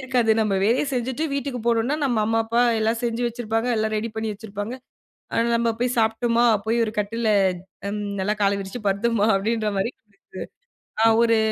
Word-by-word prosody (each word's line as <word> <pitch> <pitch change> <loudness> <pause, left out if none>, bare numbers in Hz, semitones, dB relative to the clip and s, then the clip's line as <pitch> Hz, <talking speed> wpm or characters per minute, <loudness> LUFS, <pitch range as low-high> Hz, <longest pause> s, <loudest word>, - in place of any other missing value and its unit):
இருக்காது, 250 -3 +1
நம்ம 215 -3 +1
வேலைய 230 +8 +2
செஞ்சுட்டு 255 +5 -2
வீட்டுக்கு 275 -2 -3
போனோன்னா, 235 +4 +2
நம்ம 245 -5 +1
அம்மா, 225 +1 +1
அப்பா 235 +2 +2 0.2
எல்லாம் 220 +1 +1
செஞ்சு 235 0 -1
வச்சிருப்பாங்க, 230 -1 -2
எல்லாம் 220 0 0
ரெடி 225 +2 -2
பண்ணி 220 0 -3
வச்சிருப்பாங்க, 205 +2 -6 0.6
ஆ, - - -1 0.2
நம்ம 230 0 +1
போய் 245 0 0
சாப்பிட்டம்மா, 230 +1 +2 0.2
போயி 225 +2 +1
ஒரு 215 - -4
கட்டில்ல 220 +2 -1 0.6
ம் 210 - -3 0.2
நல்லா 205 +3 +1
கால 200 0 +3
விரிச்சு 195 +5 -6
படுத்தம்மா 205 +2 +1
அப்பிடின்றமாரி 215 +1 -1
ஒரு - - -49
இது. 195 - -31 0.9
ஆ - - +5 0.2
ஒரு, 230 -1 +4
225 Hz, 170 wpm, -23 LUFS, 215-240 Hz, 0.9 s, ஆ